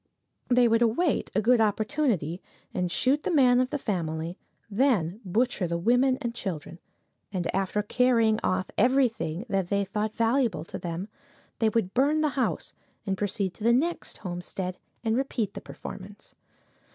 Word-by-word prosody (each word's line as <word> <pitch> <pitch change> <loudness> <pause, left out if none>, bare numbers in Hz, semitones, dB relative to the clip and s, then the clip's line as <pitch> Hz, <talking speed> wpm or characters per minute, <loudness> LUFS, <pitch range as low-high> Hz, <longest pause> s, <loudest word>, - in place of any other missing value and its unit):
They 245 -1 +5
would 230 0 +3
await 250 +8 +2
a 210 - +2
good 240 +1 +5
opportunity, 215 - 0 0.3
and 180 -1 -1
shoot 275 +9 +2
the - - -2
man 255 -7 +5
of 255 0 +1
the 290 - -1
family; 170 - -3 0.3
then 210 - +1
butcher 210 0 0
the 170 0 -1
women 245 +8 +3
and 235 -1 -2
children, 175 -7 -5 0.5
and, 180 -3 -2
after 195 +2 0
carrying 230 -1 +3
off 185 0 0
everything 235 - +2
that 195 -4 0
they 200 +1 +1
thought 210 +2 -2
valuable 230 - +1
to - - -7
them, 175 +3 -4 0.5
they 225 - +3
would 210 -4 0
burn 290 +4 +3
the 305 - +2
house 270 -2 -2 0.3
and 195 - 0
proceed 195 -1 -2
to 210 - -11
the 235 +1 +5
next 330 +8 -1
homestead 180 0 -5 0.2
and 225 -1 +1
repeat 240 -6 -1
the - - -7
performance. 200 +1 -10
215 Hz, 160 wpm, -27 LUFS, 185-250 Hz, 0.5 s, They